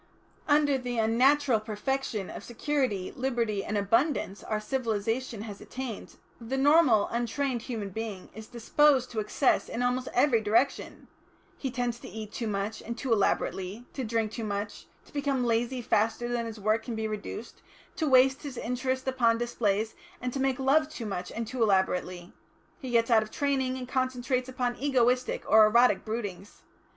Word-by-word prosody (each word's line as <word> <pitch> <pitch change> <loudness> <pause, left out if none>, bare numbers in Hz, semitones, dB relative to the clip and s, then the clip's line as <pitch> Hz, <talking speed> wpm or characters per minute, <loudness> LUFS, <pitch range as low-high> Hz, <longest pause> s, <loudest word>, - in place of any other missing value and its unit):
Under 290 -2 +3
the 245 -1 -4
unnatural 250 +3 +3
perfection 215 -1 -3
of - - -8
security, 245 -6 -1
liberty 235 -6 -1
and 210 - -2
abundance 205 +1 +1
our 215 - -2
civilisation 225 -1 -2
has 205 -3 -8
attained, 255 -4 -7 0.2
the 240 +3 -3
normal 275 -6 +5
untrained 240 +2 -1
human 220 -5 -4
being 210 -1 -6
is 220 0 -10
disposed 255 +2 +2
to 225 - -2
excess 215 +6 +1
in 245 - -2
almost 250 +1 0
every 250 -3 +4
direction; 225 +6 0 0.5
he 270 - -4
tends 245 -2 -2
to - - -10
eat 215 -1 -7
too 230 - -4
much 205 +1 -3
and 235 +1 -6
too 260 -4 0
elaborately, 200 +1 -1
to 265 - -4
drink 225 -2 -1
too 225 0 -5
much, 205 0 -4 0.2
to - - -21
become 280 -3 0
lazy 240 +2 0
faster 225 +3 +1
than 240 -1 -2
his 225 -1 -8
work 215 +2 +1
can 230 +1 -5
be 220 0 -2
reduced, 215 +2 -6 0.3
to 320 -5 -1
waste 265 0 +5
his 280 -4 -7
interest 260 +2 -2
upon 235 -3 +3
displays, 220 -2 0 0.3
and 250 0 -3
to 275 - -3
make 265 -1 +1
love 280 +3 +3
too 245 -7 -7
much 180 -3 -4
and 230 +1 -3
too 245 +2 -5
elaborately. 185 -3 +1 0.5
He 260 - -6
gets 235 0 +2
out 225 -1 +6
of 215 - -6
training, 265 -1 0
and 250 -1 -6
concentrates 255 0 -1
upon 250 -1 -2
egoistic 255 -2 +1
or 220 0 +7
erotic 235 +3 +4
broodings. 205 -4 -6
235 Hz, 170 wpm, -28 LUFS, 215-260 Hz, 0.5 s, or